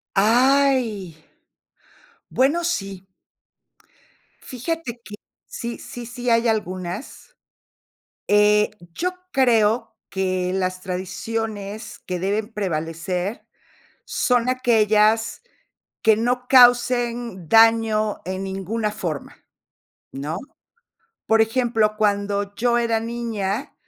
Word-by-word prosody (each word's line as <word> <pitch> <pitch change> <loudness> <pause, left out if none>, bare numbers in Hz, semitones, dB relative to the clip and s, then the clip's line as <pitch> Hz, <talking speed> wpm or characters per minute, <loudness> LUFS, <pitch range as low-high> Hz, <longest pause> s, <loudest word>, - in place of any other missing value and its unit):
Ay. 240 - +3 1.1
Bueno, 285 +7 +2
sí. 195 - -3 1.4
Fíjate 255 -2 -5
que, 210 - -11 0.3
sí 235 0 -6
sí 240 -1 -8
sí 245 +1 -3
hay 230 0 +3
algunas. 205 - -4 0.9
Eh, 210 0 +4 0.2
yo 360 - -1 0.2
creo 230 -3 +2
que 185 -1 -1
las 185 -1 -2
tradiciones 205 +3 -5
que 180 -1 -3
deben 205 +4 -2
prevalecer 180 +1 -3 0.6
son 245 -1 +1
aquellas 225 - +2 0.6
que 220 -2 +5
no 245 +2 -1
causen 240 - +4
daño 225 -1 +4
en 190 +1 -4
ninguna 200 +3 -3
forma, 170 -9 -5 0.8
¿no? 150 +6 -4 0.9
Por 225 0 +4
ejemplo, 225 -2 +1
cuando 205 -1 0
yo 240 +2 +1
era 230 -1 +1
niña, 230 -2 -3
220 Hz, 90 wpm, -22 LUFS, 195-240 Hz, 1.4 s, que